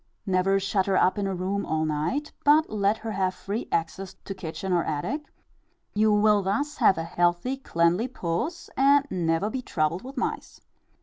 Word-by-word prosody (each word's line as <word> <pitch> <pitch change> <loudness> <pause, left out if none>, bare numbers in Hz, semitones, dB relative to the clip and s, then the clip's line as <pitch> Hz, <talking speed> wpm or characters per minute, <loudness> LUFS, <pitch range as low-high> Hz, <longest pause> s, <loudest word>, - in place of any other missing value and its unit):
Never 195 0 +2
shut 195 0 0
her 195 -1 +2
up 185 +3 +3
in 200 - 0
a 195 - -2
room 190 +3 -2
all 155 0 -1
night, 155 - -2
but 300 +2 +4
let 205 0 +1
her 225 0 -5
have 190 -2 0
free 205 +4 -4
access 185 +3 -2
to 195 - -4
kitchen 180 +1 -4
or 175 - +2
attic; 210 - -3 0.6
you 215 +1 +3
will 210 0 +4
thus 280 +10 -1
have 190 - +4
a 165 - -2
healthy, 175 +8 0
cleanly 175 -3 +1
puss, 255 - -3
and 280 +1 +4
never 170 +3 0
be 260 - -3
troubled 165 -5 -1
with 265 +2 -10
mice. - - -3
195 Hz, 180 wpm, -26 LUFS, 175-225 Hz, 0.6 s, but